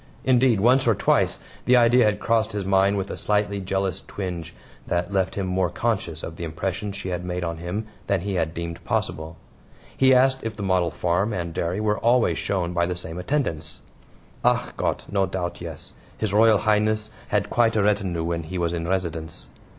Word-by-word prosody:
Indeed, 125 -4 +4
once 125 +5 +4
or 115 - +4
twice - - +2 0.3
the 125 - +5
idea 120 0 +5
had 105 -1 +1
crossed 115 -2 +1
his 100 -2 -3
mind 95 +1 +3
with 95 0 -3
a - - -5
slightly 105 -1 0
jealous 95 -1 -2
twinge 85 -4 -5 0.3
that 90 +3 -1
left 95 -2 0
him 100 - -1
more 90 -1 +1
conscious 95 -9 -2
of 80 - -6
the - - -5
impression 85 +5 -3
she 100 -1 -5
had 90 -1 -3
made 90 0 -3
on 85 -1 -3
him 90 +6 -4 0.2
than 100 -3 +1
he 100 +2 -3
had 80 -3 -1
deemed 85 +1 -5
possible. 80 0 -2 0.6
He 130 0 +4
asked 130 +1 +4
if 110 -1 -4
the 105 - -6
model 95 -3 +2
farm 90 +6 0
and 85 -3 -3
dairy 85 +4 -1
were 105 -1 0
always 120 +1 +3
shown 90 -3 -1
by 85 0 +1
the 90 - -2
same 85 0 -5
attendants. 90 - -2 0.6
"ACH - - +1
GOTT! - - -1
no 100 -1 +2
doubt, 90 -2 -4
yes; 85 -3 -7 0.2
His 105 -3 -2
Royal 110 0 +6
Highness 110 0 +1 0.2
had 105 -1 0
quite 115 -2 +3
a 105 - +3
retinue 100 -5 +1
when 85 0 -1
he 85 +4 -6
was 85 -1 0
in 85 -1 -3
residence." 85 -4 -3
95 Hz, 195 wpm, -24 LUFS, 85-105 Hz, 0.6 s, Royal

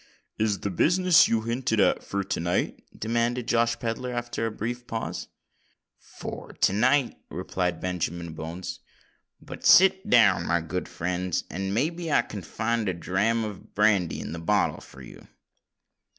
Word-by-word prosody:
"Is 105 -2 0
the 100 - -2
business 180 - +5
you 115 -1 +1
hinted 115 0 -1
at 100 - +3
for 100 0 -2
to 95 - -3
night?" 85 +1 -1
demanded 115 +2 -1
Josh 115 -1 +2
Pedler, 120 +2 -3
after 120 -1 -2
a - - -3
brief 120 +3 -5
pause. 115 0 -4 0.7
"For - - -9
to - - +2
night," 130 +5 +2
replied 90 -3 -2
Benjamin 85 -2 -3
Bones. 85 +3 -6 0.6
"But - - -10
sit 190 +1 +6
down, 100 -8 +5
my 85 - +2
good 80 +3 -4
friends, 90 0 -2
and 95 +1 -3
may 130 +11 +1
be 170 -2 -5
I - - +4
can 100 - -7
find 110 +4 -1
a 90 - -2
dram 100 +7 0
of 105 -3 -8
brandy 100 -5 +2
in - - -6
the 85 - -5
bottle 85 - +1
for 65 -1 -13
you." - - -13
105 Hz, 160 wpm, -26 LUFS, 90-120 Hz, 0.7 s, sit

